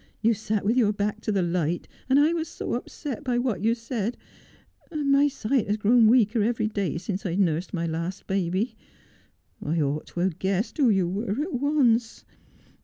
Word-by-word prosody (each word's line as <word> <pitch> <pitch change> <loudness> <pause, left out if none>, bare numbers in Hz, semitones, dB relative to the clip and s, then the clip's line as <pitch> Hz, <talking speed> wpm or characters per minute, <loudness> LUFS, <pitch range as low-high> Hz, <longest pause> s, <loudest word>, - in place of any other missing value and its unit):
You 230 +1 +3
sat 215 -1 -2
with 225 +5 +2
your 210 -4 +3
hark 210 +1 -1
to 215 - -2
the 195 -3 +1
light, 170 -1 -1 0.2
and 265 - +5
I 305 +3 +4
was 330 -1 -2
so - - -5
upset 290 -2 -5
by 250 -3 0
what 240 -7 -1
you 225 +1 +3
said 230 -1 -3 0.4
— - - -33
and 295 -3 0
my 280 +1 +5
sight 260 -3 -1
has 205 +1 0
grown 225 +2 +5
weaker 225 -1 +4
every 220 0 +1
day 200 -5 -2
since 195 +2 -4
I've 180 -2 -2
nursed 175 -2 +1
my 170 -2 -2
last 170 +3 -4
baby. 190 +4 -1 0.9
I 165 +3 -1
ought 145 0 -1
to 175 - -4
have 180 -3 -1
guessed 195 - -1
who 265 -4 +5
you 190 -4 +2
were 205 +7 -2
at 345 - -5
once. 250 -4 +1
215 Hz, 195 wpm, -26 LUFS, 185-245 Hz, 0.9 s, and